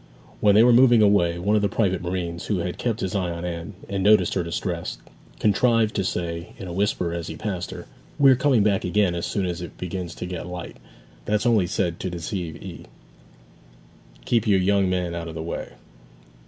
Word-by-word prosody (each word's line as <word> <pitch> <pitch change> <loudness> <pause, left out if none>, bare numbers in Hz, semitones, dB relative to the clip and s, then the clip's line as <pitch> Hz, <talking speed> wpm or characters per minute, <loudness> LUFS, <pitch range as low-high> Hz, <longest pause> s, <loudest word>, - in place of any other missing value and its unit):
When 100 -1 +4
they 110 - +7
were 120 0 +6
moving 120 -2 +6
away, 90 -5 +3
one 100 +5 +1
of 105 - +3
the 100 - +1
private 95 -4 0
marines, 85 -1 -4
who 105 - 0
had 90 0 -4
kept 115 -3 -1
his 95 - -2
eye 95 -3 0
on 85 0 -5
Anne, 85 +3 -5
and 100 -1 -2
noticed 105 +2 +4
her 95 - 0
distress, 85 0 -3 0.4
contrived 110 +1 +2
to 100 - +1
say 85 -2 -3
in 95 -5 -7
a 85 - -6
whisper 90 -3 0
as 85 -1 -4
he - - -6
passed 100 -5 -4
her, - - -8 0.3
'We 140 -1 +7
are - - +6
coming 130 -4 +3
back 100 -2 +1
again 95 0 +2
as 85 -1 -3
soon 100 -3 -1
as 90 0 -3
it 85 - -8
begins 90 -1 -5
to - - -5
get 90 -1 -5
light; 90 -1 -7 0.5
that's 105 +2 0
only 110 -7 +3
said 85 -3 -1
to 95 - -3
deceive 85 -1 -4
'ee. - - -9 1.4
Keep 115 -3 +1
your 100 -2 +4
young 100 0 +2
man 90 -2 -1
out 85 -1 -5
of 80 - -8
the 80 - -4
way.' 85 - -5
95 Hz, 210 wpm, -24 LUFS, 85-105 Hz, 1.4 s, they